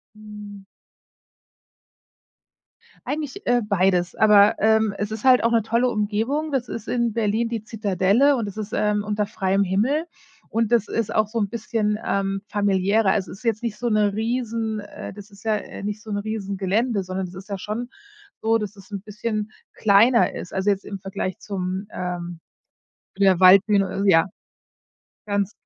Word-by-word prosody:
Hm. 210 -2 -11 2.4
Eigentlich, 300 +4 -4
äh, 245 0 +3
beides, 185 -3 +1
aber, 210 0 +6
ähm, 220 -1 +3
es 205 +1 -3
ist 220 +2 -6
halt 255 -2 +5
auch 230 - +3
'ne 230 -1 +3
tolle 235 +3 +1
Umgebung 225 +9 -1
das 260 -3 -1
ist 230 -1 -6
in 235 -2 0
Berlin 225 +1 0
die 230 -3 -3
Zitadelle 215 +5 +2
und 235 -5 -1
das 200 - -8
ist, 215 -1 -5
ähm, 210 -1 +1
unter 210 0 -1
freiem 195 0 0
Himmel 225 - +1 0.4
und 230 0 -1
das 230 -3 +3
ist 230 -2 -2
auch 215 - +3
so 230 +2 -3
'n 205 -3 0
bisschen, 215 -2 -1
ähm, 195 0 -1
familiärer. 200 0 +2
Also, 195 -3 0
es 195 - -9
ist - - -19
jetzt 225 -1 0
nicht 230 -3 -3
so 240 +2 -2
'ne 210 -2 +2
riesen 225 -1 -2
äh, 205 0 -9
das 205 0 -12
ist 200 +1 -17
ja, 220 -1 +2
äh, 205 - -8
nicht 210 +1 -4
so - - -15
'n 205 - -1
riesen 205 -1 -4
Gelände, 200 +3 0
sondern 185 +1 -3
es 180 - -12
ist 190 +3 -11
ja 200 - -3
schon 225 +5 -5 0.5
so, 225 +1 +2
dass 210 -2 -3
es 195 -1 -16
'n 200 -2 -5
bisschen 215 0 -4 0.2
kleiner 225 +4 +4
ist, 180 - -7
also 190 +2 +1
jetzt 195 -1 -1
im 200 - -6
Vergleich 190 -1 -4
zum 190 0 -4
ähm, 175 -2 -5 0.8
der 190 -3 +4
Waldbühne, 195 +1 +5
äh, - - +4
ja 165 -2 +5 1.0
ganz 200 -1 0
210 Hz, 180 wpm, -23 LUFS, 195-225 Hz, 2.4 s, aber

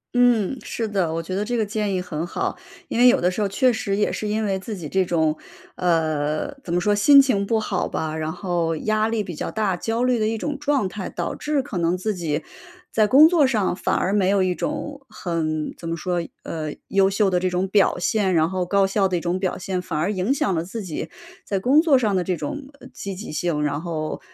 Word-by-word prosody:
嗯， 245 -1 +3
是 225 -2 -4
的， 185 -6 0
我 165 0 -2
觉 185 - -6
得 205 +2 -1
这 245 +2 -2
个 220 - +1
建 210 -1 -2
议 180 - 0
很 170 -2 -4
好。 - - -3 0.3
因 235 - -1
为 250 - +7
有 255 +2 +5
的 180 - +2
时 180 - -5
候 205 - +2
确 250 +6 +3
实 200 -3 -2
也 210 - +1
是 215 - -3
因 215 +1 0
为 195 -2 0
自 215 +2 -6
己 165 -6 -7
这 190 +2 +2
种 160 -3 +1 0.4
呃， 155 - 0
怎 170 - -3
么 175 - +2
说， 205 +2 +2
心 275 +7 +7
情 205 -7 +1
不 225 +2 +1
好 195 -3 -1
吧， 160 0 -3
然 155 0 -2
后 175 -2 -1
压 215 +6 0
力 225 -2 -1
比 180 - -7
较 - - -4
大， 205 -4 -1
焦 225 +6 -1
虑 250 -2 +2
的 215 - +1
一 225 0 -1
种 290 +4 -3
状 280 -9 +1
态。 200 +2 -7
导 - - -3
致 295 -2 -1
可 215 - -6
能 170 +1 +1
自 215 +3 -1
己， 160 -4 -2 0.5
在 215 -1 +3
工 285 +6 +8
作 325 -6 +4
上 215 -8 +1
反 - - 0
而 190 - 0
没 200 -3 +2
有 195 -1 +3
一 185 - +1
种 290 +4 -4
很 160 -6 -2
怎 165 - -8
么 165 - -1
说 175 +1 -1 0.2
呃， 155 -2 -4 0.2
优 195 0 +4
秀 200 0 +2
的 180 - +1
这 185 0 0
种 180 +1 0
表 200 -3 +3
现， 190 +1 +1
然 160 0 +3
后 185 -1 -1
高 195 +2 +3
效 195 0 +2
的 185 - -1
一 175 - +1
种 175 +1 -1
表 185 -1 -1
现， 185 -1 -3
反 160 - -4
而 175 +7 0
影 200 +7 0
响 200 -8 0
了 165 -1 -1
自 220 +5 -6
己 170 -5 -5 0.4
在 200 - -1
工 275 +9 +5
作 300 -6 +4
上 220 -5 +1
的 185 - +2
这 180 0 0
种， 290 - -5
呃， 255 - -11
积 195 -1 -6
极 205 -1 -7
性。 155 -2 -1
然 145 0 -1
后， 155 -3 -4
195 Hz, 265 characters per minute, -23 LUFS, 175-220 Hz, 0.5 s, 工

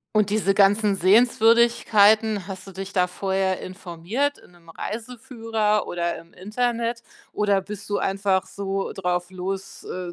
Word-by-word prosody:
Und 210 -1 +3
diese 200 -2 +1
ganzen 205 +1 +3
Sehenswürdigkeiten, 220 0 +4
hast 195 -1 -8
du 195 - -10
dich 195 +1 -7
da 180 -2 +2
vorher 190 0 -1
informiert 185 - -3
in - - -20
'nem 170 -1 -22
Reiseführer 225 +1 -2
oder 170 -1 -2
im 165 - -16
Internet 235 +3 -2 0.3
oder 200 -2 +1
bist 205 0 -8
du 205 - 0
einfach 195 -1 0
so 195 -1 -4
drauf 180 -1 -2
los 190 +1 -6
äh, 180 -1 -6
200 Hz, 140 wpm, -23 LUFS, 185-220 Hz, 0.3 s, Sehenswürdigkeiten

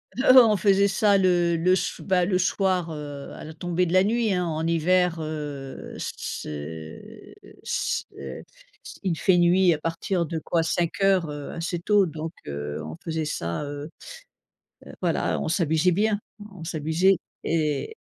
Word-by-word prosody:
Heu, 255 +1 +6
on 225 -4 +8
faisait 200 +1 +4
ça 200 0 +3
le 175 -2 +3
le 180 +3 +3
so 180 - -3
bah, 185 -2 +2
le 185 0 +1
soir, 185 -2 0
heu, 145 -2 -7
à - - -9
la 155 - -8
tombée 175 +2 -1
de 165 - -3
la 185 - +6
nuit, 225 -1 +1
hein, 180 -1 0
en 160 -1 -2
hiver, 170 +1 +2
heu, 150 -4 -6
c'est 80 +2 -7 0.3
c'est 65 -1 -4 0.6
il 175 -4 0
fait 185 -2 +4
nuit 175 +1 +5
à 155 - -3
partir 170 +2 -1
de 165 0 -3
quoi 165 +1 0
17:00 175 +1 +1
heu, 145 -1 -6
assez 170 +1 -3
tôt 205 +3 +3
donc 160 -1 -5 0.2
heu, 75 +1 -4
on 80 - -7
faisait 160 -1 -2
ça, 85 - -3
heu 145 +1 -6 1.0
heu, - - -10
voilà. - - 0
On - - -2
s'amusait 165 0 +2
bien, 205 +3 +1 0.3
on 185 -5 -10
s'amusait 165 +4 +2 0.3
et 155 - -1
170 Hz, 160 wpm, -25 LUFS, 155-185 Hz, 1.0 s, on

